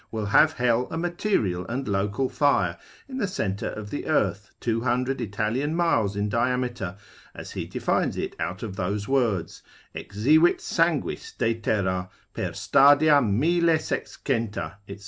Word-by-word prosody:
will 110 -2 -3
have 155 +10 +5
hell 125 -2 +1
a 160 - -4
material 170 - 0
and 130 +3 -3
local 100 +6 0
fire 125 - +2 0.3
in 265 -1 -6
the 205 - 0
centre 105 - -2
of 105 -1 -7
the - - -4
earth, - - 0
200 125 +3 0
Italian 110 +9 -1
miles 115 - +1
in 100 +1 -1
diameter, 120 -4 -1 0.4
as - - -8
he - - -4
defines - - -1
it - - -3
out 90 +4 -4
of 105 -4 -5
those 100 +2 -2
words, 120 -10 0 0.3
Exivit 150 +12 +3
sanguis 450 0 -1
de 115 - +1
terra—per 95 -5 -3
stadia 145 +1 +5
mille 160 +10 +2
sexcenta, 115 -10 -3
&c. 100 - -8
115 Hz, 140 wpm, -25 LUFS, 100-145 Hz, 0.4 s, have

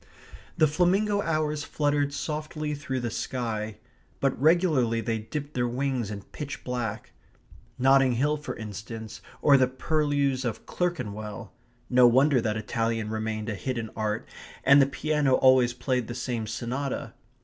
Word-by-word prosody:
The 155 - +6
flamingo 195 +6 +2
hours 155 -3 -1
fluttered 145 -1 0
softly 150 0 -3
through 135 -3 -3
the 120 -1 -2
sky. 110 -4 -3 0.4
But 135 -1 +1
regularly 155 -8 +3
they 115 -1 -1
dipped 145 +7 -6
their 120 -1 0
wings 125 -2 -1
in 100 -2 -6
pitch 145 -1 -6
black; 120 -4 -4 0.7
Notting 135 0 +5
Hill, 145 +5 +1
for 150 - -6
instance, 110 +1 -7 0.2
or 140 -2 +7
the 130 -1 +4
purlieus 140 -1 0
of 120 -4 -4
Clerkenwell. 110 - -4 0.3
No 125 0 +6
wonder 130 +2 +4
that 110 -1 -1
Italian 115 0 -1
remained 110 -1 -3
a 110 - -1
hidden 115 +1 -4
art, 110 0 -2 0.4
and 140 +1 +7
the 135 - +4
piano 145 -1 +1
always 130 -2 +5
played 125 -1 -1
the 120 - -5
same 120 -3 -3
sonata. 125 +5 -3
130 Hz, 145 wpm, -27 LUFS, 115-145 Hz, 0.7 s, or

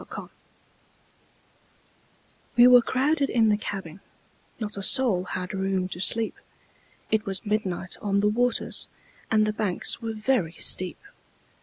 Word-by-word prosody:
Field] - - -8 2.3
WE 240 - +8
were 250 0 +8
crowded 275 +4 0
in 225 -2 +3
the 210 - +4
cabin, 195 -4 -6 0.6
Not 210 -2 -4
a 200 - -5
soul 205 -5 +3
had 180 0 -5
room 190 -1 -1
to 175 - -6
sleep; 225 +4 +2 0.7
It 220 0 +1
was 195 +3 -3
midnight 195 -4 -2
on 200 -1 0
the 210 - +2
waters, 245 +2 0 0.4
And 215 -1 +3
the 215 - -1
banks 210 +2 -2
were 225 -1 -4
very 215 -6 0
steep. 185 0 0
210 Hz, 135 wpm, -25 LUFS, 190-230 Hz, 2.3 s, WE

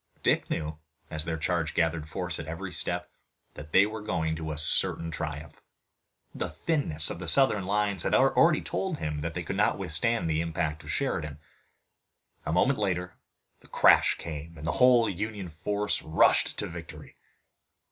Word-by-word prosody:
Dick - - +2
knew, 75 0 -3 0.3
as 80 0 0
their 80 -1 -2
charge 80 0 -1
gathered 80 -2 0
force 90 -1 -3
at 80 - -7
every 90 +4 -6
step, - - -2 0.4
that 75 0 -11
they 95 +4 +6
were 110 +1 -6
going 80 -6 -2
to 80 -2 -5
certain 80 +1 +2
triumph. 75 0 -6 0.7
The - - -4
thinness 110 - 0
of - - -6
the 90 - -6
Southern 105 -3 +4
lines 100 -2 0
had - - +2
already 155 +4 +4
told 190 -5 -3
him 75 - -4
that 80 +1 -4
they 90 - -3
could 95 +3 -4
not 105 - +2
withstand 95 +4 +1
the 80 0 0
impact 80 -2 -3
of - - -11
Sheridan. 75 -2 -2 1.1
A - - 0
moment 125 - +2
later 90 -3 -2 0.4
the - - -20
crash - - +5
came 80 +1 -8
and 80 - -8
the 85 - 0
whole 125 -2 +5
Union 100 0 -4
force 100 +6 -2
rushed 80 0 +2
to - - -3
victory. 85 -1 -10
85 Hz, 165 wpm, -28 LUFS, 80-105 Hz, 1.1 s, they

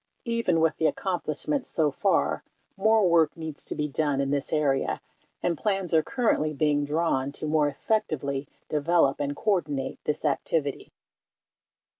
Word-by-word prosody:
Even 230 -8 +1
with 160 -1 +2
the 160 - +3
accomplishments 190 - -2
so 155 -3 +2
far, - - +1 0.3
more 220 0 +4
work 165 -2 +3
needs 160 -2 -5
to - - -4
be 150 - -1
done 145 -1 0
in 140 0 0
this 145 -1 -1
area 145 -3 +1 0.4
and 175 -1 +1
plans 195 -5 -1
are 160 - +6
currently 215 - 0
being 145 0 +1
drawn 145 -3 0
to 155 - -3
more 150 -1 +2
effectively 140 -5 -1 0.2
develop 150 -1 +2
and 145 0 -2
coordinate 150 -10 -1
this 150 - -2
activity. 145 0 -1
155 Hz, 145 wpm, -27 LUFS, 145-175 Hz, 0.4 s, are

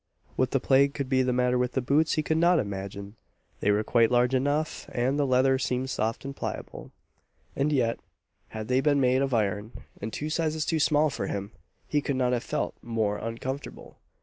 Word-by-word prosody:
What 130 - +1
the 135 - +1
plague 140 +2 +3
could 140 -3 -3
be 130 -1 +3
the 130 0 +1
matter 125 0 +2
with 125 0 0
the - - +1
boots, 145 +5 +2
he 155 - 0
could 160 +1 0
not 175 +1 +4
imagine! 100 -1 -5 0.4
They - - 0
were 105 +1 +3
quite 115 0 +3
large 125 +1 +2
enough, 145 +4 -1
and 130 +4 0
the 145 - +2
leather 130 +1 +3
seemed 130 0 -1
soft 115 +1 -2
and 140 0 -5
pliable; - - -6 0.7
and 145 +2 +1
yet, 120 -5 +1 0.5
had 110 -1 -6
they 130 +1 +2
been 145 0 +3
made 130 0 +3
of 135 -1 0
iron, 105 -1 -1 0.3
and 110 +2 -4
two 150 +6 -4
sizes 155 -1 0
too 165 -2 0
small 150 0 +3
for - - -3
him, 100 +1 -4 0.4
he 150 - +1
could 140 - -2
not 125 -1 +1
have 120 - -1
felt - - -2
more 110 -3 -1
uncomfortable. 125 +5 -6
130 Hz, 205 wpm, -27 LUFS, 115-140 Hz, 0.7 s, not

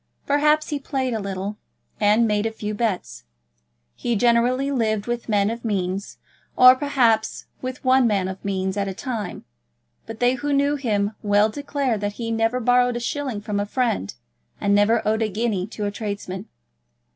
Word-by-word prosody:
Perhaps 300 +2 +2
he 295 -2 -2
played 265 -3 -2
a 220 - -1
little, 195 +1 -4 0.4
and 215 +2 +4
made 210 0 +1
a - - -3
few 210 -1 -5
bets. 210 - -3 0.7
He 240 - -2
generally 245 +4 +2
lived 220 -5 0
with 240 -1 -4
men 205 0 +2
of 235 +1 -6
means; 195 -2 -2 0.4
or 255 0 +9
perhaps 255 -5 +1 0.2
with 255 +1 -6
one 255 -1 +5
man 200 -4 +1
of 190 0 -7
means 190 0 -2
at 200 -1 0
a 190 - -4
time; 225 -5 -5 0.6
but 225 -1 -8
they 245 +1 +3
who 285 +3 -2
knew 280 +1 +2
him 210 -7 0
well 205 +1 +3
declared 275 -3 -2
that 205 0 -2
he 230 +1 -4
never 225 +2 +1
borrowed 245 0 +3
a - - -2
shilling 255 -3 -3
from 205 -1 -2
a 205 - 0
friend, 220 - -1 0.4
and 200 - +1
never 210 +3 +3
owed 220 +1 +1
a 220 - +1
guinea 205 -3 -1
to 210 -1 -5
a 205 - -1
tradesman. 200 -1 -5
225 Hz, 180 wpm, -23 LUFS, 205-250 Hz, 0.7 s, or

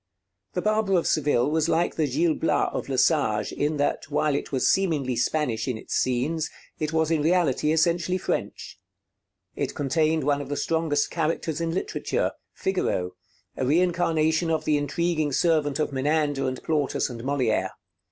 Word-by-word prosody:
'The 180 - -2
Barber 215 -2 +1
of 170 - 0
Seville' 145 -3 +2
was 160 +1 +1
like 165 +2 +1
the 155 -2 0
'Gil 160 +5 +1
Blas' 150 -2 +1
of - - -4
Lesage 130 -6 +2
in 150 +1 -1
that, 145 0 -1
while 150 0 +1
it 140 - -3
was 130 -2 +1
seemingly 150 -10 +1
Spanish 120 -2 0
in 125 -4 -1
its - - -7
scenes, 145 +6 0 0.3
it 155 -1 -1
was 160 0 +1
in 160 -2 +2
reality 155 -3 +2
essentially 170 +3 +2
French. - - -4 0.8
It - - -3
contained 155 +2 +1
one 145 0 +1
of 140 - -8
the 145 - -2
strongest 160 -3 0
characters 165 -1 -1
in 165 - -1
literature, 405 - -1 0.2
Figaro, 135 - -1 0.4
a - - -2
reincarnation 165 +1 +2
of 160 -1 0
the 150 - +2
intriguing 155 +1 0
servant 150 -1 +2
of 150 -2 -1
Menander 145 0 0
and 130 0 -4
Plautus 150 -4 0
and 120 -3 -7
Molière. 130 -3 0
155 Hz, 160 wpm, -25 LUFS, 140-165 Hz, 0.8 s, Seville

